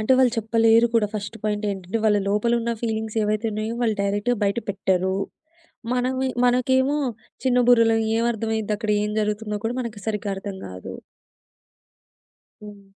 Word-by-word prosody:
అంటే 215 +5 +2
వాళ్ళు 250 -3 +4
చెప్పలేరు 225 +1 +4
కూడా 220 -2 +4
ఫస్ట్ 205 +2 -4
పాయింట్ 210 0 -1
ఏంటంటే, 195 +3 -3
వాళ్ళ 210 -1 +4
లోపల 210 +4 +1
ఉన్న 235 +1 -2
ఫీలింగ్స్ 220 -1 -3
ఏవైతే 215 +2 0
ఉన్నాయో 215 +2 -3
వాళ్ళు 225 -3 +2
డైరెక్ట్‌గా 205 +4 0
బయట 200 +3 +1
పెట్టరు. 190 -1 0 0.8
మనము 260 +1 0 0.2
మనకేమో 260 +3 +2 0.5
చిన్న 250 -1 +3
బుర్రలం 230 -2 +5 0.2
ఏం 230 - +1
అర్థమైయిద్దక్కడ 220 -1 -2
ఏం 210 - -2
జరుగుతుందో 210 0 -2
కూడా 235 - -1
మనకి 230 -3 -6
సరిగ్గా 210 -1 -2
అర్థం 195 0 -6
కాదు. 90 0 -8 1.7
హ్మ్. 205 -1 -11
220 Hz, 145 wpm, -23 LUFS, 205-235 Hz, 1.7 s, బుర్రలం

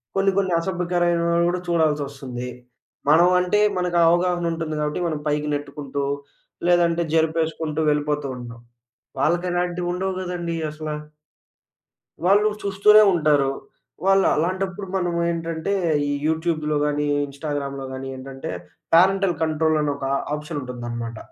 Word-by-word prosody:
కొన్ని 195 0 +3
కొన్ని 190 -3 +1
అసభ్యకరమైనవి 175 -1 +1
గూడా 180 - -1
చూడాల్సొస్తుంది. 140 -6 -1 0.6
మనం 165 +4 +6
అంటే, 180 +3 +1 0.2
మనకు 180 -1 0
అవగాహన 175 0 +1
ఉంటుంది 160 -1 -3
గాబట్టి 150 +3 -1
మనం 155 -3 -2
పైకి 150 0 0
నెట్టుకుంటూ, 140 -1 -4 0.6
లేదంటే 170 -1 +3
జరుపేసుకుంటూ 160 -1 0
వెళ్ళిపోతూ 150 -1 -1
ఉంటాం. 120 -1 -9 0.6
వాళ్ళకి 175 +3 +1
అలాంటివి 175 0 -1
ఉండవు 190 +1 -2
గదండీ 175 -2 -3 0.2
అసల. 155 0 -6 1.4
వాళ్ళు 205 +3 +5
చూస్తూనే 200 +2 +6
ఉంటారు. 150 -4 +3 0.6
వాళ్ళు 195 0 +5
అలాంటప్పుడు 185 +4 -2
మనమేంటంటే, 170 0 -1 0.3
ఈ - - -1 0.2
యూట్యూబ్‌లో 160 -1 0
గాని, 150 0 0 0.2
ఇన్‌స్టాగ్రామ్ 140 -1 -4 0.2
గాని 135 0 -6
ఏంటంటే, 135 0 -7 0.4
పేరెంటల్ 190 +1 +4
కంట్రోల్ 155 0 +1
అని 145 -1 0
ఒక 135 -1 -4 0.3
ఆప్షన్ 150 +1 -5
ఉంటుందన్నమాట. 120 -2 -5
165 Hz, 115 wpm, -23 LUFS, 150-175 Hz, 1.4 s, మనం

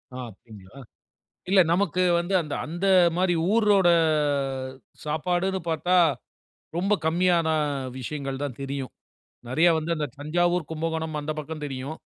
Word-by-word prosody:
ஆ, - - -6
அப்படிங்களா? 100 +2 -16 0.7
இல்ல 195 -1 +6
நமக்கு 185 -1 +1 0.2
வந்து 175 +3 -3
அந்த 150 -2 -5
அந்த 175 +5 -3 0.3
மாதிரி 180 0 +2 0.2
ஊரோட 205 -5 +4 1.2
சாப்பாடுன்னு 175 +5 -1
பார்த்தா, 165 +3 0 0.8
ரொம்ப 195 +4 +1
கம்மியான 170 0 +2 0.5
விஷயங்கள் 135 +1 -5
தான் 140 -5 -5
தெரியும். 135 -1 -4 0.6
நிறையா 160 +7 +4
வந்து 160 +2 -3
அந்த 150 -2 -2
தஞ்சாவூர், 175 +3 0
கும்பகோணம் 160 0 -3
அந்த 150 +1 -3
பக்கம் 155 0 -7
தெரியும். 135 +2 -6
160 Hz, 120 wpm, -25 LUFS, 145-180 Hz, 1.2 s, இல்ல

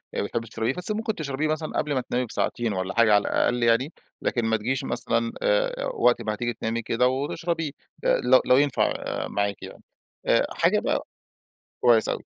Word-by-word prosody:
بتحبي 115 +3 -2
تشربيه، 115 +4 -2
بس 180 +4 -3
ممكن 220 0 -2
تشربيه 150 0 -2
مثلًا 155 0 -2
قبل 150 -1 0
ما 130 - +1
تنامي 125 +1 -2
بساعتين 115 -1 -2
والّا 95 +1 -3
حاجة 115 -2 +4
على 105 - +5
الأقل 120 -1 +1
يعني، 120 +7 +2 0.3
لكن 120 -2 0
ما 110 0 +2
تجيش 120 +5 -2
مثلًا 115 0 -1
آآ - - +1
وقت 390 - +3
ما 110 -1 -2
هتيجي 120 +1 -2
تنامي 115 +1 -3
كده 120 +3 +1
وتشربيه، 150 +4 -2 0.3
لو 130 +1 +4
لو 125 - +5
ينفع 145 -3 +2 0.3
معاكِ 100 0 -2
يعني، - - -10 0.7
حاجة - - +2
بقى - - -1 0.8
كويس 115 -3 +5
أوي. - - -3
125 Hz, 170 wpm, -25 LUFS, 115-150 Hz, 0.8 s, على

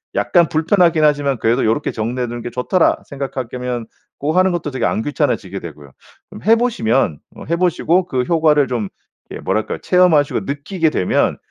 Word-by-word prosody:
약간 170 -3 +3
불편하긴 165 0 +2
하지만 145 -3 +2
그래도 115 +4 +1
'요렇게 115 +7 0
정리해 120 +3 -3
두는 120 0 -6
게 120 - -5
좋더라.' 145 +9 +1
생각할 135 -3 -5
거면 125 -2 -4 0.3
고거 155 +5 -1
하는 185 0 +3
것도 170 -4 -3
되게 130 - -2
안 - - 0
귀찮아지게 125 - -2
되고요. 75 -4 -11 0.4
좀 - - -10
해 225 +3 +5
보시면 135 - 0 0.2
어 - - -10
해 170 - +2
보시고 180 0 +1
그 130 -6 -1
효과를 155 -2 +3
좀 115 -6 -3 0.4
이렇게 - - -8
뭐랄까. 110 - -1
체험하시고 180 -6 +3
느끼게 160 +4 -1
되면 95 -11 0
145 Hz, 400 characters per minute, -18 LUFS, 120-170 Hz, 0.4 s, 해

